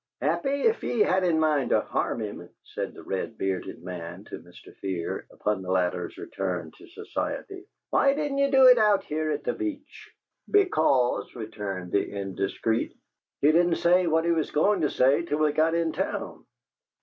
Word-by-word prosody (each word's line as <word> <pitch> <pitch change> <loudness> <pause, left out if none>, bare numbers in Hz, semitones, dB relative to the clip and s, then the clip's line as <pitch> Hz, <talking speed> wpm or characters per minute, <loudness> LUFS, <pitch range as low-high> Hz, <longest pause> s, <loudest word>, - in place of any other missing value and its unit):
"Happy, 280 0 0
if 455 0 +2
ye 230 - -1
had 190 -2 +3
it - - +2
in 160 -2 +2
mind 150 -4 +2
to - - +4
harm - - -2
him," - - -6
said - - -6
the - - -11
red 95 +4 -4
bearded 95 -2 -3
man 90 +1 -7
to - - -9
Mr. 90 +1 -16
Fear, 90 -4 -4
upon 105 -2 -2
the 90 - -8
latter's 90 -1 -1
return 90 -2 -4
to 370 - -15
society, 390 0 -5 0.2
"why 275 0 +4
didn't 290 -2 -2
ye 280 0 +3
do 265 -1 +6
it 250 -2 +8
out 210 -2 +4
here 155 +1 -2
at 150 -1 -2
the - - -1
Beach?" 310 -4 -6 0.4
"Because," 155 - +2
returned 105 -6 -6
the 100 - +1
indiscreet, 100 +3 -2 0.5
"he 145 - +5
didn't 170 +1 +3
say 180 +1 +3
what 160 0 +2
he 170 - +2
was 160 -3 0
goin' 190 +5 +2
to 150 - +2
say 135 +5 +3
till 170 -3 -2
we 155 -1 +2
got 160 +2 +2
in 165 -1 +1
town." - - -4
155 Hz, 185 wpm, -26 LUFS, -, 0.5 s, it